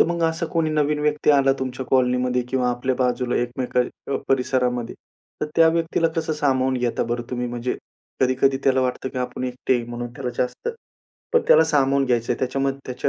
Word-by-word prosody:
तर - - +7
मग 170 0 -1
असा 165 0 0
कोणी 160 -1 0
नवीन 150 -1 +1
व्यक्ती 150 0 +2
आला 135 -1 +4
तुमच्या 130 0 -4
कॉलनीमध्ये 125 0 +2
किंवा 125 -1 0
आपल्या 125 +2 -1
बाजूला 125 -1 0
एकमेक 125 +1 -2 0.5
परिसरामध्ये. 125 -2 0 0.5
तर - - 0
त्या 165 -1 +7
व्यक्तीला 165 0 +1
कसं 160 -1 0
सामावून 130 -3 +1
घेता 120 -1 0
बरं 120 0 -2
तुम्ही? 125 0 -2
म्हणजे 120 +1 -3 0.4
कधी-कधी 130 +1 +3
त्याला 130 -1 +3
वाटतं, 130 +1 -1
की 130 - -6
आपण 125 0 -3
एकटे 125 -1 0
म्हणून 120 0 -6
त्याला 125 -1 -4
जास्त 125 - -2 0.6
पण 475 -1 +4
त्याला 160 +1 +7
सामावून 140 -3 +2
घ्यायचं 120 -1 +1
आहे. - - -4
त्याच्यामध्ये 135 0 -2
130 Hz, 175 wpm, -23 LUFS, 125-145 Hz, 0.6 s, तर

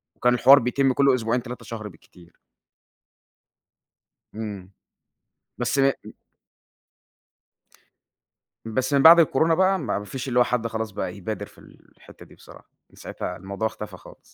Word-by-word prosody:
وكان 125 0 +2
الحوار 135 +3 +6
بيتم 130 +2 0
كل 140 0 +3
أسبوعين 120 0 -1
3 125 +1 -9
شهر 110 -2 -7
بالكتير. 85 -1 -19 2.0
امم. 100 -4 -7 0.9
بس 120 +3 -1
م 135 - +4 2.8
بس 130 +5 -2
من 140 - +3
بعد 170 +1 +9
الكورونا 160 +1 +2
بقى 190 +2 +2
ما 135 - -3
ما 105 - -9
فيش 130 +5 -7
اللي 125 -1 +1
هو - - +6
حد 120 -1 -2
خلاص 110 -1 -5
بقى 90 -2 -5
يبادر 105 +3 -5
في - - -22
الحتة - - -18
دي - - -19
بصراحة. - - -17 0.2
من - - -23
ساعتها - - -7
الموضوع 100 +4 -4
اختفى 105 -3 -9
خالص. - - -16
120 Hz, 140 wpm, -23 LUFS, 105-135 Hz, 2.8 s, بعد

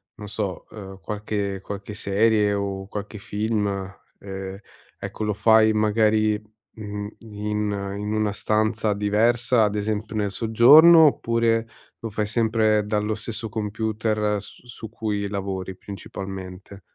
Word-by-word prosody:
non 105 -1 -9
so, 100 -3 -4
uhm, 95 -3 -10
qualche 105 -2 -3
qualche 100 +1 -7
serie 105 0 +2
o 100 -1 -3
qualche 105 +1 -6
film, 105 +1 -1 0.5
ehm, 95 -1 -7 0.4
ecco 110 - -6
lo 105 - 0
fai 110 +1 +5
magari, 110 0 +2 0.3
mhmm, 105 -1 -5
in 105 -1 -3 0.3
in 105 +1 -3
una 110 -1 +1
stanza 110 0 0
diversa, 110 +3 +2
ad 105 - -1
esempio 105 +1 -2
nel 105 -2 0
soggiorno, 135 - +7
oppure 115 -3 +1 0.3
lo 115 - -5
fai 105 +1 -2
sempre 110 -1 +2
dallo 105 0 -1
stesso 110 0 -5
computer 105 0 -1
s - - -14
su 115 -2 -9
cui 105 -2 -3
lavori 95 -2 -4
principalmente? 95 0 -8
105 Hz, 125 wpm, -24 LUFS, 100-110 Hz, 0.5 s, soggiorno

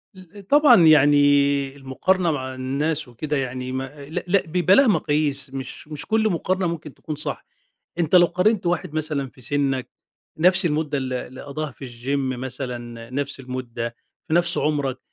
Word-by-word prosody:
ال 185 +2 -14
طبعًا 280 - +6
يعني 145 -2 +4
المُقارنة 165 +6 0
مع 130 -2 -4
الناس 145 +4 -1
وكده 145 +5 -3
يعني 130 -1 -4
ما 135 +2 -6
لأ 160 - -3
لأ 190 +1 +3
بيبقى 180 +3 +3
ليها 275 +1 +6
مقاييس، 145 -6 +1
مش 135 +2 -7
مش 150 -2 -5
كل 220 0 +2
مُقارنة 185 +1 0
ممكن 160 -3 -5
تكون 155 - -7
صح. 150 - -3 0.5
أنت 165 0 0
لو 175 -1 +8
قارنت 180 +3 +1
واحد 175 -2 -1
مثلًا 150 -4 -2
في 135 - -19
سِنَّك 135 -1 -1 0.5
نَفْس 180 +2 +4
المُدّة 150 -2 -1
اللي 130 -1 -3
اللي 130 - -11
قضّاها 150 +2 -5
في 135 +1 -10
الgym 130 +2 -3
مثلًا، 120 -2 -6
نَفْس 140 +1 -3
المُدّة 120 -2 -5 0.3
في 155 - 0
نَفْس 175 +1 +4
عُمرك، 140 -4 -1
145 Hz, 165 wpm, -23 LUFS, 130-170 Hz, 0.5 s, لو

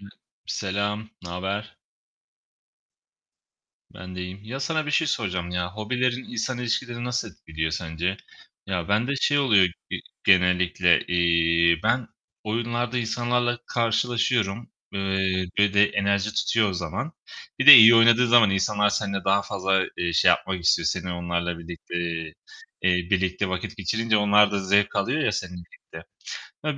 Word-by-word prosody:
Hı 100 - -13 0.4
Selam! 105 +2 -3
Naber? 95 +4 -5 2.1
Ben 90 +1 -11
de - - -5
iyiyim. 90 +2 -8
Ya, 130 +5 -7
sana 155 +2 -2
bir - - -3
şey 160 +2 +1
soracağım 90 - -3
ya! 90 0 -3
Hobilerin 125 +4 -2
insan 120 +2 -4
ilişkilerini 120 0 -3
nasıl 125 -2 -3
etkiliyor 80 -2 -5
sence? 85 +3 -3 0.5
Ya, 90 -2 -3
bende 115 +7 0
şey 145 - +2
oluyor 110 -9 +4 0.3
ge - - -2 0.3
genellikle. 90 -1 +3
İii, 85 -1 +2
ben 115 +2 0 0.4
oyunlarda 120 +2 -2
insanlarla 120 +1 -1
karşılaşıyorum, 115 -2 -1 0.2
eee, 95 -1 -1
ve 100 -1 +2
de 100 0 +6
enerji 100 +1 -1
tutuyor 110 -3 +1
o - - -5
zaman. 90 - -5 0.5
Bir - - -1
de 145 - +14
iyi 115 0 +9
oynadığın 115 +2 +5
zaman 115 -3 +5
insanlar 105 +2 +1
seninle 100 -1 -3
daha 100 +1 +2
fazla, 95 -1 -1
eee, 85 -1 -2
şey 80 - +3
yapmak 95 -2 +1
istiyor; - - +2
seni, 90 - -2
onlarla 85 0 -3
birlikte, 85 +1 -10 0.9
eee, 90 -1 +1
birlikte 95 0 0
vakit 95 +4 -5
geçirince 110 +3 0
onlar 105 0 +4
da 100 - 0
zevk 100 +2 +2
alıyor 120 +10 -1
ya, 115 - 0
seninle 90 -2 -6
birlikte. - - -14 0.6
Ya, 150 -2 -2
100 Hz, 145 wpm, -24 LUFS, 90-115 Hz, 2.1 s, de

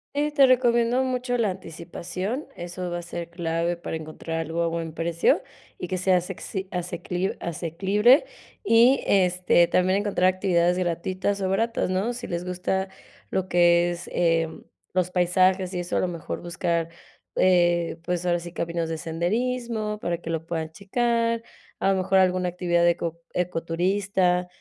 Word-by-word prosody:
Y 295 +1 +1
te 280 -2 +6
recomiendo 245 0 +3
mucho 250 -1 -1
la 220 -4 +1
anticipación, 185 - -5
eso 175 +1 -5
va 175 0 -3
a - - -6
ser 170 0 -6
clave 170 0 -1
para 170 - -4
encontrar 160 +1 -5
algo 165 +1 -2
a - - +1
buen 165 -1 -3
precio 165 +1 +1 0.3
y 180 - -5
que 185 - -2
sea 185 0 +3
asecci 190 +2 -5
asecli 180 +1 -3
asequible, 195 - +3 0.4
y 245 - +5
este, 180 -2 +3
también 185 +3 +2
encontrar 190 -3 +2
actividades 180 -2 +2
gratuitas 185 +3 -1
o 190 - 0
baratas, 225 +1 0
¿no? 195 +6 0
Si 240 0 -6
les 175 0 -4
gusta 185 +1 -2 0.4
lo 190 -1 -1
que 175 -1 +4
es, 175 0 -7
em, 165 -2 0 0.3
los 180 0 0
paisajes 185 +1 +2
y 180 - -2
eso, 175 - -2
a - - +3
lo - - +1
mejor 170 -2 -5
buscar, 170 -1 -1 0.5
eh 175 -2 +3
pues 180 0 -2
ahora 175 -1 +2
sí 170 0 -9
caminos 170 -1 -2
de 165 - -2
senderismo 215 +6 -2
para 175 -4 -2
que 165 - -6
lo 165 0 -3
puedan 160 -2 -3
checar, 230 +5 0 0.4
a 195 - +2
lo 195 - +1
mejor 190 +1 +2
alguna 185 -1 +3
actividad 175 -1 +1
eco 170 -1 -2
ecoturista 180 +1 0
180 Hz, 160 wpm, -25 LUFS, 170-195 Hz, 0.5 s, te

